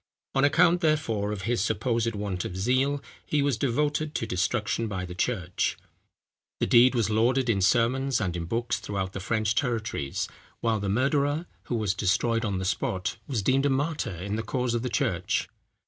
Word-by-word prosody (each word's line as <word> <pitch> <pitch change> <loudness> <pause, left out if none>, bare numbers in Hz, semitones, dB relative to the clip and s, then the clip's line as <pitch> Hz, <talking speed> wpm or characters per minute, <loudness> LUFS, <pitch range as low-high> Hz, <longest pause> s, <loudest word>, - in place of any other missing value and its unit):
On 135 - +2
account, 175 +4 +4
therefore, 120 - +1
of 100 -3 -4
his 115 -2 +1
supposed 115 +1 0
want 100 -3 -3
of 90 - -5
zeal, 130 +7 +1 0.2
he 145 -2 0
was 140 -3 +2
devoted 150 +5 0
to - - -1
destruction 105 +4 0
by 95 -3 -3
the 90 - -7
church. 90 -2 -1 0.8
The - - +2
deed 125 +2 +6
was 110 -3 +1
lauded 120 +3 +3
in 100 -3 0
sermons 125 +6 +2
and 90 -5 -1
in 85 -1 -3
books, 115 +6 -1
throughout 95 -2 -3
the - - -4
French 110 +2 0
territories; 115 - -1 0.3
while 115 -2 +1
the 100 -1 -2
murderer, 140 - +1 0.2
who 120 - -2
was 105 -4 +1
destroyed 110 +5 +1
on 100 -4 -1
the 95 - -3
spot, 95 0 -1
was 120 -8 -1
deemed 135 +5 +3
a - - +1
martyr 140 - -1
in 100 +5 -3
the - - -1
cause 125 +1 -1
of 120 - 0
the 125 - -2
church. 115 - 0
115 Hz, 185 wpm, -27 LUFS, 100-135 Hz, 0.8 s, deed